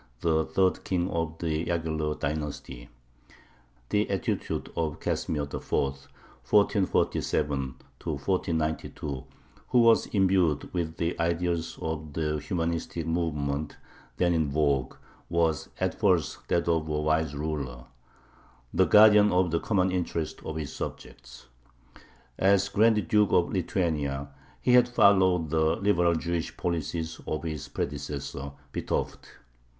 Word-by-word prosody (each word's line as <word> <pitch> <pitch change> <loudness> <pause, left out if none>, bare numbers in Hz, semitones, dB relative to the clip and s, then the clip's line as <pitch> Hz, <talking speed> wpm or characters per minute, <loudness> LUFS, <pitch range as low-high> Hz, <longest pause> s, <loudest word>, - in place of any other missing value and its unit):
the 80 -2 +2
third 95 +3 +1
king 90 -1 0
of 80 -1 -2
the 80 -1 -1
Yaghello 80 -3 -2
dynasty. 70 -4 -4 1.0
The 105 +1 +1
attitude 95 -4 -2
of 80 -3 -2
Casimir 75 -2 -1
IV. 70 - -8 0.2
(1447 70 - 0 0.3
1492), 80 -3 -2 0.4
who 125 - +3
was 115 -1 +5
imbued 95 -7 +1
with 85 -2 -2
the 85 +1 -2
ideas 85 0 -1
of 80 -2 -4
the 75 -1 -1
humanistic 85 +1 -2
movement 75 -3 -2 0.4
then 85 -1 +2
in 80 -3 +1
vogue, 70 -3 +1 0.3
was 85 -3 +1
at - - -1
first - - +1
that 85 - +1
of 80 -2 +1
a 75 0 0
wise 80 -1 +1
ruler, 70 -5 -4 0.9
the 95 +2 +4
guardian 105 0 +7
of 90 -1 +2
the 85 - +1
common 95 -2 +1
interests 85 -3 -2
of 80 - -5
his 80 -3 -4
subjects. - - -8 0.9
As 100 +1 +3
Grand 105 -3 +3
Duke 105 +1 +3
of 85 - +3
Lithuania 75 -7 -1 0.3
he 125 - +3
had 125 0 +6
followed 95 -8 +4
the 80 0 +2
liberal 90 -4 +2
Jewish 85 0 -3
policies 80 -1 -3
of 75 0 -2
his 80 -3 -4
predecessor 70 -1 -5 0.2
Vitovt. - - -3
80 Hz, 120 wpm, -28 LUFS, 75-90 Hz, 1.0 s, guardian